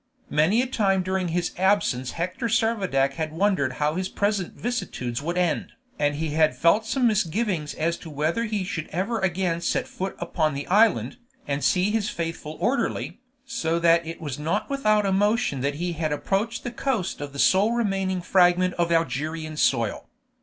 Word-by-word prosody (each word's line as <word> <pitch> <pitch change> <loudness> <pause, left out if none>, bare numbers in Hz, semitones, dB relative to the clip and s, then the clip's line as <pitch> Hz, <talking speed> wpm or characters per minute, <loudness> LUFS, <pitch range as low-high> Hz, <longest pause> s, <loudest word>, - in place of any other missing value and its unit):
Many 180 +11 +3
a - - -2
time 195 -7 +1
during 185 0 -1
his 175 +1 -1
absence 185 -10 +1
Hector 180 +7 -2
Servadac 200 - +1
had 155 0 -3
wondered 165 -6 +1
how 150 +3 0
his 185 +2 -2
present 200 -3 -1
vicissitudes 140 - -3
would 170 +4 -3
end, 175 -3 0 0.3
and 145 0 +1
he 160 +1 -2
had 155 0 +3
felt 205 +7 +3
some 255 +2 +1
misgivings 195 -6 0
as 170 +2 -1
to 165 - -10
whether 155 +10 -1
he 210 -3 -2
should 170 -4 -4
ever 210 +7 -2
again 180 -2 0
set - - 0
foot 190 +1 -5
upon 155 -3 -1
the 140 - -4
island, 220 +4 +3 0.3
and 140 0 -2
see 185 +2 +2
his 215 -1 0
faithful 165 -2 -5
orderly, 240 +10 -1 0.3
so 165 -10 -1
that 170 0 +4
it 165 0 -7
was 145 -4 -5
not 160 - -1
without 215 -7 +2
emotion 205 - +1
that 140 +2 -1
he 175 +3 -2
had 155 -1 -2
approached 200 +9 -1
the 245 - -4
coast 240 - -2
of 145 -1 -5
the 140 - -10
sole 195 +9 +4
remaining 195 -5 0
fragment 180 0 +3
of 170 -1 +1
Algerian 155 0 -1
soil. 115 -7 0
175 Hz, 175 wpm, -25 LUFS, 155-205 Hz, 0.3 s, that